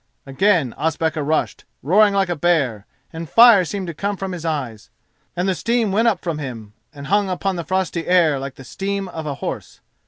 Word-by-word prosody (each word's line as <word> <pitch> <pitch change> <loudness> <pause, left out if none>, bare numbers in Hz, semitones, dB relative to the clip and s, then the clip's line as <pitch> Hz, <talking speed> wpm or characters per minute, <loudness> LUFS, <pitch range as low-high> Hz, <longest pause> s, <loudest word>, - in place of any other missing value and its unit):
Again 150 - +1
Ospakar 160 0 -1
rushed, 155 +2 -1 0.2
roaring 205 +8 +4
like 195 -2 +1
a 175 - -1
bear, 145 -11 0 0.3
and 165 -1 -7
fire 230 -5 +7
seemed 190 +3 -4
to 170 - -5
come 200 +5 -3
from 190 0 -4
his 175 -3 -6
eyes, 130 -9 -4 0.5
and 180 +2 -1
the 190 - +2
steam 230 +2 0
went 225 +4 +2
up 225 - +1
from 165 -4 -3
him 115 -7 -7 0.2
and 140 -2 -10
hung 200 +3 +1
upon 190 +1 -2
the 170 - -4
frosty 180 -2 -2
air 165 -6 +3
like 135 0 -6
the 135 - -12
steam 195 +8 -4
of 160 -3 -6
a 140 - -3
horse. - - -6
170 Hz, 200 wpm, -20 LUFS, 145-195 Hz, 0.5 s, fire